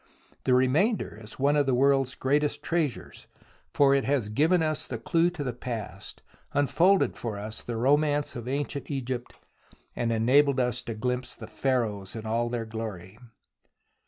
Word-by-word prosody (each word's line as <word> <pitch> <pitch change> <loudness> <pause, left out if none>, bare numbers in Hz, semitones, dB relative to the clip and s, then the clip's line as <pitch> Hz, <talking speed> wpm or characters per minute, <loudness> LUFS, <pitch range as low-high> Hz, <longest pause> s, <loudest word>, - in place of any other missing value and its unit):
The 130 - +4
remainder 135 - +1
is 105 0 -10
one 140 +2 +2
of 145 -2 +2
the 130 - +3
world's 135 0 +3
greatest 145 +2 0
treasures, 165 -6 -2 0.4
for 140 -1 +4
it 140 -1 +2
has 135 -6 0
given 160 +10 +3
us 155 -1 0
the 120 - -4
clue 165 +8 +2
to 175 -4 -5
the 125 -3 -3
past, 115 -5 -7 0.3
unfolded 170 +7 +3
for 110 -4 -4
us 105 +2 -5
the 120 - -5
romance 145 +4 +2
of 120 0 -6
ancient 140 0 -3
Egypt, 130 -3 -4 0.6
and 115 -1 -1
enabled 130 +5 +3
us 125 -1 0
to 115 - -6
glimpse 125 +3 -2
the - - -9
Pharaohs 110 -8 -1
in 110 -1 -6
all 115 +2 0
their 120 -1 -3
glory. 110 -3 -7
130 Hz, 160 wpm, -27 LUFS, 115-145 Hz, 0.6 s, The